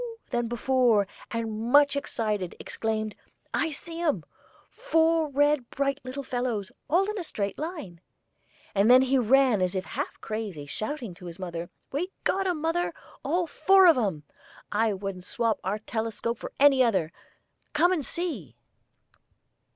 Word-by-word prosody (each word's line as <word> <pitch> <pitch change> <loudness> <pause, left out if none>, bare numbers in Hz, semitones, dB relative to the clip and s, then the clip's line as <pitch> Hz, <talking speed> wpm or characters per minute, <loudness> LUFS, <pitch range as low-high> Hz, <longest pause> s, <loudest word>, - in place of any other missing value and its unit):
than 240 -1 0
before, 240 -3 +3 0.2
and, 225 0 -3
much 285 0 +6
excited, 215 -9 -2
exclaimed: 220 -1 -2 0.4
"I 325 - +1
see 330 +3 -6
'em: 295 - +1 0.5
four 325 -1 +2
red 290 -2 +2
bright 275 0 -1
little 260 +2 -5
fellows, 245 -6 -2 0.2
all 365 +6 +3
in 425 0 -3
a - - -3
straight 200 - -3
line," 300 - -6 0.7
and 200 +3 +3
then 255 +1 +8
he 265 0 +2
ran 250 -2 +4
as 185 +1 0
if 185 0 -2
half - - -4
crazy, 210 -9 -5
shouting, 215 - -4
to 180 +1 -11
his 170 0 -8
mother: 175 -2 -5 0.2
"We 325 +7 -2
got 385 +1 +1
'em, 345 -4 -1
mother, 330 +2 0 0.3
all 345 +5 +1
four 380 +5 +5
of 340 - +8
'em! 195 - -1 0.5
I 220 +1 +2
wouldn't 195 -2 -5
swap 230 +2 0
our 195 +3 -1
telescope 225 +1 -3
for - - -6
any 275 -2 +6
other. 190 -9 +1 0.6
Come 340 +4 +4
and 340 -6 0
see!" 270 - -4
245 Hz, 150 wpm, -27 LUFS, 205-300 Hz, 0.7 s, then